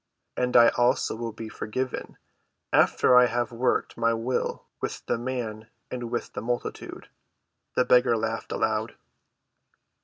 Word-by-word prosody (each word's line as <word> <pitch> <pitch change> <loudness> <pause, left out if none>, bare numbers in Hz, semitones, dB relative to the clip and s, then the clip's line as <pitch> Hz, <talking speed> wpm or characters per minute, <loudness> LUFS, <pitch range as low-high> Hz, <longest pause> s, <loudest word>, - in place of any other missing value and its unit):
"And 125 0 +2
I 120 0 +8
also 120 -2 +1
will 115 0 -4
be 110 +1 -8
forgiven, 125 +4 -4 0.6
after 125 - +4
I 125 0 +7
have 120 +1 -1
worked 120 +2 0
my 115 0 +2
will 120 +3 -2 0.2
with - - -4
the 115 - -1
man 115 -3 -4 0.2
and 125 -2 -4
with 120 0 -4
the - - -4
multitude." 120 +2 -4 0.7
The 125 - +3
beggar 125 -2 +4
laughed 115 +1 -3
aloud. 110 0 -1
120 Hz, 140 wpm, -26 LUFS, 115-125 Hz, 0.7 s, I